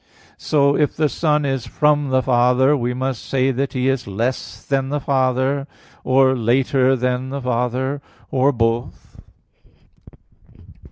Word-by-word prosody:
So 140 -2 +2
if 150 -1 0
the 155 -1 +1
Son 150 -1 0
is 135 -3 -2
from 150 -2 +1
the 130 0 +1
Father, 125 +3 +3
we 125 -3 -1
must 130 -1 -3
say 135 0 0
that 135 +2 -2
He 130 -1 -1
is 135 -4 -1
less 115 +6 -4
than 135 -1 -1
the 145 +1 -1
Father, 135 0 0 0.4
or 130 0 +3
later 130 +2 +2
than 125 +1 -2
the 140 +1 -4
Father, 125 +3 -1 0.3
or 135 +2 +3
both. 115 -1 -3
130 Hz, 135 wpm, -20 LUFS, 125-140 Hz, 0.4 s, Father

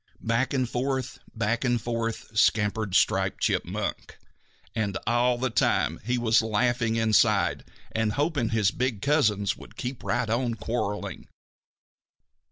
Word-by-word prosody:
Back 115 +3 +1
and 130 -3 0
forth, 130 +1 -2 0.2
back 115 +2 0
and 120 -2 +2
forth, 115 -1 -4
scampered 105 -2 +2
Striped - - +2
Chipmunk, - - -2 0.6
and 105 -3 -1
all 120 +2 +2
the 130 0 -1
time 80 -7 +1
he 125 +3 0
was 115 -2 +3
laughing 115 +1 +1
inside 110 -2 +3 0.3
and 110 -1 0
hoping 145 -5 0
his 110 -3 +2
big 125 -5 -2
cousins 110 - +2
would - - -14
keep 125 0 -5
right 115 - 0
on 115 +1 0
quarreling. 105 -1 -4
115 Hz, 130 wpm, -26 LUFS, 110-125 Hz, 0.6 s, was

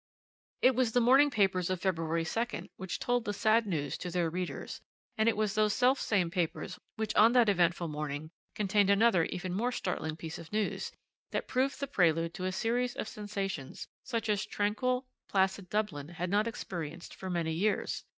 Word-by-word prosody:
"It 260 - +7
was 245 -2 +1
the 245 - +5
morning 265 +5 +6
papers 195 -7 +2
of 185 -1 -1
February 165 -3 0
2nd 230 +9 -3
which 190 -1 -4
told 245 -1 0
the 205 -2 -3
sad 220 +1 +3
news 150 -7 -2
to 180 - -4
their 170 -2 0
readers, 180 +1 -4 0.3
and 220 -1 +3
it 225 - 0
was 215 -2 +1
those 215 -1 +2
selfsame 225 -9 +2
papers 180 +1 -2 0.2
which 220 -1 -2
on 225 +3 +6
that 240 -4 +5
eventful 175 -2 +2
morning 150 0 -4 0.2
contained 205 -1 +2
another 200 -4 +4
even 180 0 -4
more 235 +6 0
startling 165 -8 -2
piece 160 0 -7
of 165 - -11
news, 215 -1 -1 0.4
that - - -3
proved 265 +2 0
the 280 - -1
prelude 165 - +2
to 185 - -4
a 185 - 0
series 240 +5 0
of - - -4
sensations 200 - -5 0.2
such 230 -3 -2
as 210 -1 +1
tranquil, 250 +6 0 0.2
placid 190 -1 +1
Dublin 175 -9 -2
had 175 +1 -4
not 210 +2 +3
experienced 175 -8 -6
for 190 - -7
many 170 -3 -1
years. 205 +6 0
195 Hz, 180 wpm, -31 LUFS, 175-225 Hz, 0.4 s, It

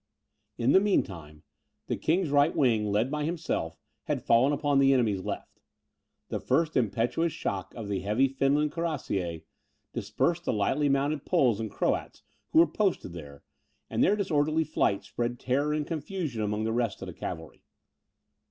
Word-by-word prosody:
In 120 +3 +2
the 190 - +7
mean 205 0 +3
time, 75 -5 -11 0.4
the - - -1
king's 165 -1 0
right 145 +2 +3
wing, 110 -6 +2
led 110 +6 +1
by 150 0 -1
himself, 155 - -2 0.3
had - - -2
fallen 120 +5 +4
upon 145 -1 +1
the 135 0 +5
enemy's 110 -7 +1
left. - - -6 0.7
The - - -2
first 160 -1 +1
impetuous 120 - +1
shock 95 -9 -4
of 115 -3 -6
the 100 -2 -1
heavy 105 +8 +2
Finland 140 +3 +1
cuirassiers 125 - -3 0.5
dispersed 135 - -1
the - - +1
lightly 130 +8 +1
mounted 140 +2 +1
Poles 125 - +2
and 110 -1 -3
Croats, - - -2 0.3
who - - 0
were 165 - +9
posted 175 - -1
here, 70 -4 -10 0.5
and - - +2
their 205 - +4
disorderly 160 -5 +1
flight 130 -10 0
spread 120 0 -3
terror 140 +4 0
and 150 -1 -1
confusion 155 - -4
among 105 +1 -1
the 110 0 -1
rest 115 -3 -1
of - - -4
the - - -7
cavalry. 80 -1 -7
135 Hz, 165 wpm, -28 LUFS, 105-155 Hz, 0.7 s, were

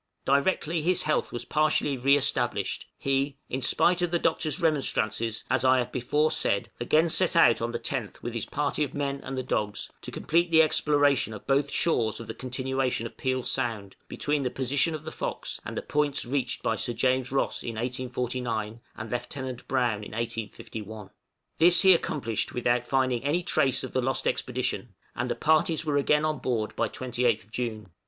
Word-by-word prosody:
Directly 155 +3 +1
his 180 +3 +2
health 155 - 0
was 120 0 -5
partially 150 -2 +1
re 135 +3 +4
established, 140 - -1
he, 135 0 0
in 130 - -2
spite 175 +6 +2
of 175 - +1
the 175 - +1
Doctor's 160 0 0
remonstrances, 115 - 0
as 130 0 +1
I 130 0 +5
have 125 -1 -1
before 150 +5 +1
said, 100 - 0
again 155 +7 +3
set 170 +2 +3
out 120 -10 +5
on 115 +1 -1
the 120 - -2
10th 120 -2 -4
with 120 - -4
his 115 -3 -3
party 150 +1 -1
of 140 - -4
men 140 -1 -2
and 135 0 -5
the 130 - -1
dogs, 105 -4 -2
to - - -6
complete 170 +2 +1
the 160 -1 +6
exploration 145 -7 +2
of 105 - -11
both 140 +1 +2
shores 120 -11 +1
of 115 - -7
the 110 - -6
continuation 130 -1 -2
of 115 - -7
Peel 130 -1 -1
Sound, 115 -8 -2
between 145 0 -1
the 130 - 0
position 135 +5 +1
of 155 - -7
the 160 - -5
'Fox' - - -4
and - - -6
the - - -3
points 145 -2 0
reached 130 0 -2
by 115 - +1
Sir 120 - -2
James 130 +2 +1
Ross 135 - 0
in 115 - -5
1849, 125 -2 -3 0.2
and 110 +1 -6
Lieutenant 125 +1 -5
Browne 120 -5 0
in 105 - -9
1851. 110 -2 -5 0.5
This 175 +2 +6
he 190 -1 +8
accomplished 125 - -1
without 120 0 +1
finding 130 -3 +1
any 155 +5 +1
trace 135 -5 +2
of - - -6
the 130 - +1
lost 130 +1 -1
expedition, 125 -4 -2 0.2
and 125 - -2
the - - 0
parties 160 0 +2
were 145 -2 +1
again 150 +2 +3
on 155 -2 -1
board 115 -4 -2
by 115 - +1
28th 120 -3 -1
June. 110 -4 -4
130 Hz, 190 wpm, -27 LUFS, 120-145 Hz, 0.5 s, he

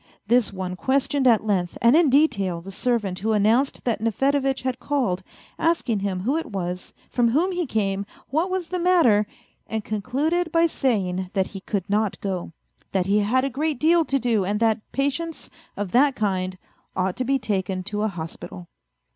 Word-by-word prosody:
This 235 +1 +3
one 185 -2 -4
questioned 270 +4 +1
at 225 -3 +4
length 185 -5 0
and 235 +4 +5
in 325 -3 +5
detail 200 - +2
the 190 +3 -9
servant 205 -3 -1
who 220 +2 0
announced 225 +6 +2
that 230 -4 -1
Nefedevitch 270 +4 +1
had 255 -1 -2
called, 245 -9 0 0.4
asking 325 -10 +1
him 195 -2 -2
who 265 +10 +1
it 325 - -3
was, 180 -3 -4 0.2
from 240 -1 +2
whom 315 +11 +2
he 355 -3 -2
came, 200 -3 -1 0.2
what 320 +7 +1
was 370 -3 -2
the 365 - -2
matter, 330 - +4 0.4
and 220 -1 -3
concluded 285 - -1
by 330 +1 +4
saying 190 - 0
that 190 -2 +1
he 195 - -5
could 195 -1 -3
not 210 0 0
go, 185 -4 -3 0.4
that 190 -2 +1
he 200 +2 +3
had 250 +6 +2
a - - 0
great 295 +1 -1
deal 330 +2 +4
to 275 - +1
do, 235 -6 +1
and 205 +3 -1
that 225 -1 +2
patients 295 +4 -2 0.3
of 200 -3 -3
that 270 +2 +4
kind 185 -3 -1 0.4
ought 185 0 0
to 255 - 0
be 270 +2 +2
taken 190 -5 -2
to 205 +2 -3
a 215 - +2
hospital. 175 -1 -7
225 Hz, 185 wpm, -24 LUFS, 195-275 Hz, 0.4 s, and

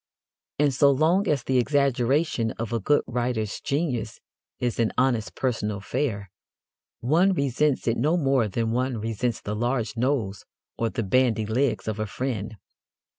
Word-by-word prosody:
And 145 -1 +2
so 140 +2 +5
long 165 +8 +3
as 145 -5 +1
the 130 -1 +2
exaggeration 135 -2 +1
of 115 +1 -5
a 115 - +1
good 145 +8 +2
writer's 120 -3 -2
genius 135 -7 -2 0.4
is 120 -2 -2
an 115 -2 +2
honest 125 -4 +1
personal 110 -5 -1
affair, 100 -2 -3 0.7
one 170 +10 +3
resents 140 -2 0
it 115 - +2
no 155 +8 +2
more 135 -7 +2
than 115 +3 -1
one 125 +1 0
resents 115 +2 -2
the 105 - -4
large 120 +1 -1
nose 115 -5 -1 0.3
or 115 - -1
the 115 0 -3
bandy 115 +1 +2
legs 110 -1 0
of 110 -1 -2
a 110 - -1
friend. 110 -2 -4
120 Hz, 155 wpm, -25 LUFS, 110-140 Hz, 0.7 s, so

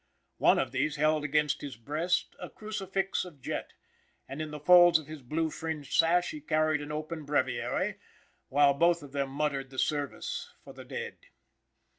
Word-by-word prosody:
One - - +5
of - - 0
these 155 - 0
held 155 +1 +2
against 150 -1 +1
his 140 -6 -7
breast 155 +9 -1
a - - -7
crucifix 195 -3 -2
of 175 -6 -11
jet, - - -5 0.5
and 135 +4 -6
in 155 - -4
the 150 0 -7
folds 175 +2 +7
of 155 - -8
his 155 0 -9
blue 155 +5 -1
fringed 160 -3 -5
sash 175 +2 +3
he 155 - -7
carried 155 0 +1
an 145 +1 -6
open 155 +1 -4
breviary, 130 -4 -1 0.5
while 140 +1 +5
both 170 +2 +3
of 140 - -11
them 140 -1 -1
muttered 140 -1 -2
the 130 - -12
service 145 +1 -2
for - - -11
the - - -11
dead. 475 -1 -6
150 Hz, 175 wpm, -30 LUFS, 140-165 Hz, 0.5 s, folds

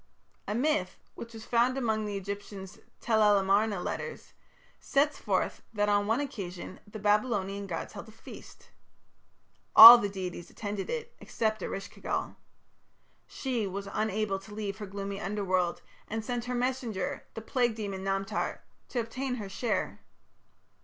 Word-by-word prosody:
A 210 - -2
myth, 240 -8 0 0.2
which 230 - -9
was 220 - -9
found 245 +2 +2
among 220 -4 0
the 205 -1 -3
Egyptian 200 0 -6 0.3
Tel 220 -2 +2
el 210 -1 +6
Amarna 200 +1 +2
"Letters", 470 - -5 0.5
sets 285 +1 +1
forth - - -1
that 205 -1 +1
on 205 0 +2
one 225 +4 +2
occasion 185 -10 -6
the 205 - -8
Babylonian 205 -2 0
gods 165 -3 -5
held 205 +1 -8
a - - -12
feast. 215 - -13 1.0
All 235 +2 +14
the 205 - -1
deities 185 -3 -6
attended 205 -2 -5
it, 475 0 -4
except 220 -1 -2
Eresh 195 +1 -5
ki - - -17
gal. - - -2 0.9
She 245 -6 -2
was 200 +1 -5
unable 215 -2 -1
to 205 +2 -12
leave 210 -1 -4
her 210 - -6
gloomy 200 +1 -5
Underworld, 185 -3 -1 0.2
and 220 0 -4
sent 245 -1 -3
her 250 0 -3
messenger, 245 -6 -2
the 225 - -5
plague 240 -1 +1
demon 200 -3 -5
Namtar, 195 +1 -2 0.3
to 250 - -2
obtain 250 +3 -3
her 210 -5 -6
share. 215 +3 -2
210 Hz, 155 wpm, -29 LUFS, 195-235 Hz, 1.0 s, All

